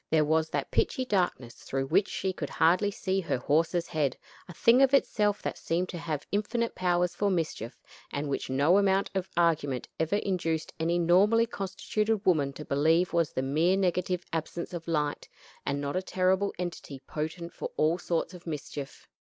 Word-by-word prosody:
There 155 -1 +3
was 160 +1 +2
that 145 -2 -3
pitchy 260 - +1
darkness 175 - 0
through 135 0 -3
which 190 +8 +3
she 190 -1 -2
could 145 -5 -5
hardly 180 +6 +3
see 195 -1 -1
her 165 - -1
horse's 165 +6 +1
head 145 -5 -1 0.3
a 175 - -9
thing 235 +8 +5
of 270 0 +6
itself 210 -6 +1
that - - -3
seemed 175 +2 -1
to 175 - -5
have 155 -3 -3
infinite 230 +3 -1
powers 180 -1 +1
for 205 - 0
mischief, 160 - -3 0.3
and 145 +1 -3
which 140 - -3
no 145 +9 +4
amount 195 -1 +2
of 190 -1 -2
argument 150 -6 +1
ever 160 +5 +1
induced 175 -6 -1
any 170 +2 +1
normally 195 +7 +4
constituted 210 +1 -2
woman 150 -7 +3
to 150 - -8
believe 160 +5 +2
was 170 -2 +1
the 130 - -1
mere 160 +8 +2
negative 180 -1 0
absence 165 +2 -3
of 170 -1 -6
light, 150 -3 -1 0.4
and 140 0 0
not 140 0 -3
a 185 - +1
terrible 190 +1 +1
entity 170 -6 -5
potent 160 +3 -4
for - - -5
all 160 +3 +2
sorts 170 +1 -2
of 175 -1 -12
mischief. 145 -2 -6
170 Hz, 180 wpm, -29 LUFS, 155-190 Hz, 0.4 s, of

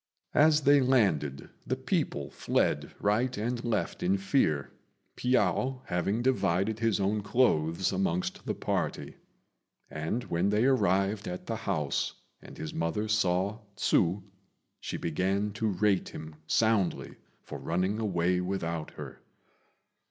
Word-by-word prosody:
As 155 +1 +5
they 140 0 +5
landed 95 - +1 0.2
the - - +1
people - - -2
fled - - 0
right 115 +5 +1
and 120 +3 -2
left 115 -3 -1
in 95 +2 +2
fear, 95 - +1 0.4
Piao 130 +1 +1
having 100 +6 -1
divided 110 -4 +1
his 115 -2 +1
own 100 +2 +1
clothes 95 -7 +2
amongst 95 -2 -1
the - - -1
party; - - -2 0.7
and 80 +11 -2
when 85 +1 0
they 105 +3 +2
arrived 100 -4 +2
at 90 0 -5
the - - -2
house, 75 -2 -1 0.3
and - - -12
his 80 - -5
mother 85 +6 -1
saw 100 0 +1 0.2
Hsü, 90 +1 +2 0.6
she - - -4
began 95 +5 0
to 110 +2 -2
rate 100 -1 +1
him 80 0 -8
soundly 110 -5 +1 0.3
for - - -7
running 95 +6 -1
away 90 -4 +1
without 85 -4 -3
her. - - -8
100 Hz, 130 wpm, -29 LUFS, 90-110 Hz, 0.7 s, As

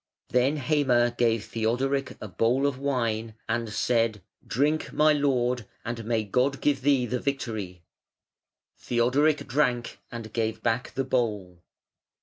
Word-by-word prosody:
Then 130 +4 +2
Heime 130 -4 +2
gave 115 -3 +1
Theodoric 130 +5 -1
a 110 - -6
bowl 115 +8 +1
of 140 -2 -1
wine 115 -5 -1
and 115 -1 -1
said: 115 -3 +1 0.2
"Drink, 150 +5 0
my 155 0 +4
lord, 125 -5 +1 0.2
and 115 0 -4
may 115 -1 0
God 125 +7 +1
give 140 -2 +1
thee 135 -2 +3
the 125 +1 -2
victory". 110 - -4 1.0
Theodoric 135 +6 +2
drank 125 -3 0
and 115 -2 -7
gave 110 -1 -2
back 120 +2 -1
the 135 - 0
bowl. 105 -9 -2
120 Hz, 135 wpm, -27 LUFS, 115-135 Hz, 1.0 s, my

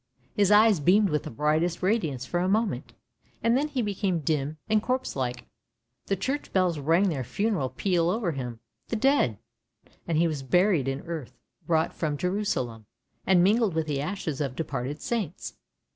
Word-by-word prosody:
" 125 0 -37
His 200 -2 +3
eyes 210 -3 +6
beamed 195 +7 +4
with 150 -1 +1
the - - -4
brightest 155 +7 0
radiance 165 - 0
for 175 - -1
a 180 +1 +1
moment, 200 - 0 0.5
and 230 +1 +3
then 285 +3 +1
became 205 - -1
dim 150 0 -1
and 215 0 +3
corpse 255 +3 -2
like. 125 -2 -3 0.6
The 195 - +1
church 265 +10 -3
bells 180 -4 +1
rang 165 +7 +3
their 140 -6 -2
funeral 195 - -1
peal 170 +4 +1
over 195 -2 0
him 125 -5 -6
— - - -51
the - - -1
dead; 220 - +2 0.7
and 165 -2 0
he 170 +1 +4
was 155 -4 -3
buried 175 +1 +2
in 135 +1 -2
earth 165 -6 -7 0.3
brought 160 -1 +1
from 150 -3 -2
Jerusalem, 140 - -2 0.4
and 180 -2 +5
mingled 210 -1 +3
with 160 -1 0
the 145 -2 -2
ashes 155 -3 -3
of 135 -3 -2
departed 145 -2 -3
saints. 210 -9 -3
170 Hz, 175 wpm, -27 LUFS, 140-205 Hz, 0.7 s, eyes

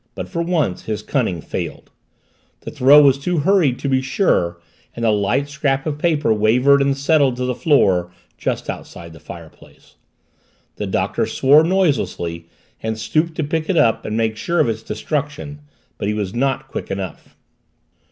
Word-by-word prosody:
But - - -5
for 170 -3 -3
once 160 - -1
his 105 -1 -4
cunning 110 - -1
failed - - -6 0.7
the - - -7
throw 145 +3 +6
was 135 -1 +4
too 175 +5 -1
hurried 155 -5 +2
to - - -4
be 130 -1 +2
sure 130 - 0 0.4
and 115 - -3
the 110 - +4
light 105 +7 0
scrap 140 -2 -1
of 150 -2 -3
paper 150 -8 +2
wavered 125 +7 +3
and 140 0 +1
settled 140 -2 +2
to 125 +1 -3
the 125 - -1
floor 95 - +2 0.2
just - - -3
outside 85 -1 -8
the 80 - -13
fireplace. 80 +1 -14 0.8
The - - -3
Doctor - - -1
swore 145 +4 +4
noiselessly 140 - -1 0.3
and 110 0 -3
stooped 155 +9 -1
to 160 - -1
pick 160 +3 -2
it 185 - +1
up 115 -7 +3
and 110 +1 -3
make 110 -1 0
sure 170 +11 -1
of - - +3
its 110 0 -3
destruction. 145 +1 -4 0.4
But - - -2
he 105 - -1
was 100 -2 -3
not 135 +2 -1
quick - - -6
enough. 95 -3 -6
135 Hz, 170 wpm, -19 LUFS, 110-150 Hz, 0.8 s, throw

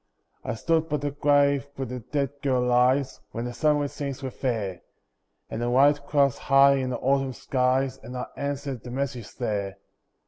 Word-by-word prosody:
I - - -3
stood 160 +6 0
by 150 - +1
the 145 0 -3
grave 140 -1 +3
where 135 - -3
the 125 0 -5
dead 135 +3 -2
girl 130 -3 +1
lies, 125 +2 +2
When 115 +1 -3
the 120 - -4
sunlit 145 0 +1
scenes 140 -1 -5
were 130 - -3
fair, 110 -9 -3 0.7
And 110 - -5
the 120 - 0
white 140 +3 +4
clouds 140 -3 +2
high 140 0 +5
in 130 -1 -1
the 125 - -2
autumn 135 -1 +1
skies, 130 +1 0
And 125 +3 -7
I 125 - -3
answered 140 -3 -4
the 125 - -9
message 130 -3 -4
there. 100 -5 -2
135 Hz, 180 wpm, -26 LUFS, 125-140 Hz, 0.7 s, high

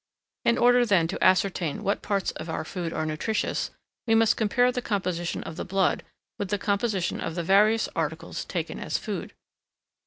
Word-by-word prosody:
In 235 - +4
order 245 0 +5
then 190 -8 +3
to 190 - -2
ascertain 185 -2 +2
what 200 0 0
parts 200 -2 0
of 160 - -8
our 160 - -3
food 175 -1 -4
are 155 - -2
nutritious, 155 +8 -1 0.4
we 225 - +4
must 225 +1 +4
compare 245 +3 +2
the 250 - -3
composition 185 -6 -2
of 160 - -8
the - - -3
blood 190 0 +1 0.4
with 200 - -1
the 205 - 0
composition 200 -2 0
of 165 - -3
the 170 - -2
various 210 +5 +4
articles - - -3
taken - - -4
as - - -1
food. - - -5
195 Hz, 180 wpm, -26 LUFS, 175-220 Hz, 0.4 s, order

